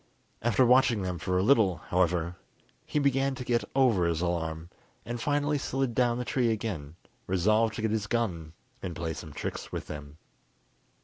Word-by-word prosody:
After 120 Hz, +2 st, +3 dB
watching 125 Hz, -4 st, +4 dB
them 90 Hz, -2 st, -3 dB
for 90 Hz, +2 st, 0 dB
a 90 Hz, -, +2 dB
little, 105 Hz, -7 st, +4 dB
however, 90 Hz, -1 st, +1 dB, 0.5 s
he -, -, -2 dB
began 135 Hz, -1 st, +2 dB
to 125 Hz, -, -5 dB
get 120 Hz, -1 st, +1 dB
over 115 Hz, -10 st, +4 dB
his 85 Hz, -2 st, 0 dB
alarm, 85 Hz, -1 st, -2 dB, 0.3 s
and 120 Hz, 0 st, -4 dB
finally 145 Hz, +2 st, +1 dB
slid 135 Hz, -2 st, -1 dB
down 120 Hz, 0 st, +2 dB
the 125 Hz, -, -3 dB
tree 125 Hz, -2 st, +1 dB
again, 95 Hz, -10 st, -3 dB, 0.3 s
resolved 110 Hz, +5 st, +2 dB
to 110 Hz, -, -4 dB
get 110 Hz, -, +1 dB
his 105 Hz, -2 st, -1 dB
gun 90 Hz, -9 st, -2 dB, 0.3 s
and 90 Hz, -2 st, -5 dB
play 80 Hz, 0 st, -3 dB
some 75 Hz, -, -8 dB
tricks -, -, -5 dB
with -, -, -4 dB
them. 75 Hz, 0 st, -8 dB
110 Hz, 175 wpm, -29 LUFS, 85-125 Hz, 0.5 s, watching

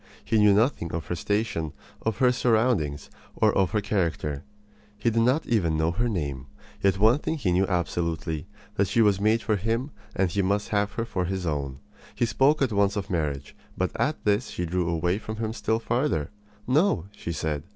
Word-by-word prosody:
He 110 Hz, -1 st, +2 dB
knew 105 Hz, -1 st, +6 dB
nothing 105 Hz, -, +1 dB
of 80 Hz, -3 st, -3 dB
her 90 Hz, -, -3 dB
station, 100 Hz, -5 st, -1 dB, 0.3 s
of 110 Hz, -2 st, -1 dB
her 125 Hz, +1 st, +4 dB
surroundings, 110 Hz, -, +1 dB, 0.3 s
of 95 Hz, -2 st, +3 dB
her 105 Hz, -, 0 dB
character. 80 Hz, -8 st, -1 dB, 0.5 s
He 115 Hz, +3 st, +1 dB
did 115 Hz, +1 st, +2 dB
not 130 Hz, +7 st, +2 dB
even 85 Hz, -9 st, +1 dB
know 80 Hz, +1 st, +2 dB
her 115 Hz, +7 st, 0 dB
name. 70 Hz, -, -3 dB, 0.3 s
Yet 95 Hz, -1 st, +3 dB
one 110 Hz, +7 st, +5 dB
thing 160 Hz, -, -2 dB
he 105 Hz, -11 st, 0 dB
knew 95 Hz, +2 st, +2 dB
absolutely 85 Hz, -3 st, -2 dB, 0.3 s
that 100 Hz, -, +3 dB
she 115 Hz, +5 st, +3 dB
was 100 Hz, -2 st, +3 dB
made 110 Hz, +2 st, +2 dB
for 110 Hz, -2 st, +1 dB
him 115 Hz, +8 st, -1 dB, 0.2 s
and 95 Hz, -1 st, +2 dB
that -, -, -8 dB
he 100 Hz, -, +2 dB
must 100 Hz, +2 st, 0 dB
have 105 Hz, -1 st, 0 dB
her 115 Hz, -, -2 dB
for 95 Hz, -6 st, -2 dB
his 95 Hz, 0 st, -3 dB
own. 70 Hz, -4 st, -3 dB, 0.3 s
He -, -, +2 dB
spoke 135 Hz, +6 st, +3 dB
at 130 Hz, -, +1 dB
once 100 Hz, 0 st, +2 dB
of 100 Hz, -1 st, -4 dB
marriage; 75 Hz, -5 st, -2 dB, 0.2 s
but -, -, 0 dB
at -, -, -1 dB
this 105 Hz, +3 st, +2 dB
she 90 Hz, -, -3 dB
drew 85 Hz, 0 st, -1 dB
away 85 Hz, +4 st, 0 dB
from 110 Hz, 0 st, -6 dB
him 110 Hz, 0 st, -3 dB
still 110 Hz, -1 st, 0 dB
farther. 115 Hz, -, -1 dB, 0.3 s
"No," 140 Hz, -, +2 dB
she 85 Hz, -, -5 dB
said. 80 Hz, -3 st, -2 dB
100 Hz, 200 wpm, -26 LUFS, 85-115 Hz, 0.5 s, knew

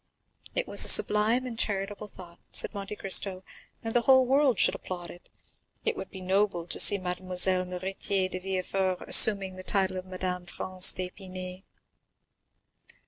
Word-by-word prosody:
"It -, -, -3 dB
was -, -, +4 dB
a -, -, -6 dB
sublime 220 Hz, +5 st, +4 dB
and 235 Hz, -3 st, -8 dB
charitable 200 Hz, 0 st, -4 dB
thought," 175 Hz, -4 st, -15 dB
said -, -, -4 dB
Monte 200 Hz, 0 st, -8 dB
Cristo, 190 Hz, -1 st, +2 dB, 0.4 s
"and 225 Hz, 0 st, -6 dB
the 240 Hz, -, +2 dB
whole 260 Hz, +1 st, +3 dB
world 265 Hz, -2 st, +1 dB
should -, -, +2 dB
applaud 175 Hz, -2 st, -9 dB
it. 175 Hz, -, -18 dB, 0.6 s
It -, -, -2 dB
would -, -, -9 dB
be 190 Hz, -, -12 dB
noble 190 Hz, -2 st, -2 dB
to -, -, -6 dB
see 200 Hz, -, +6 dB
Mademoiselle 185 Hz, 0 st, -1 dB
Noirtier 190 Hz, +1 st, -4 dB
de 185 Hz, 0 st, -7 dB
Villefort 190 Hz, 0 st, -4 dB
assuming 195 Hz, -3 st, +7 dB
the 185 Hz, -, -10 dB
title 190 Hz, -1 st, -2 dB
of 185 Hz, 0 st, -9 dB
Madame 180 Hz, -1 st, -6 dB
Franz 185 Hz, +1 st, +2 dB
d'Épinay." 185 Hz, 0 st, -8 dB
190 Hz, 155 wpm, -26 LUFS, 185-205 Hz, 0.6 s, assuming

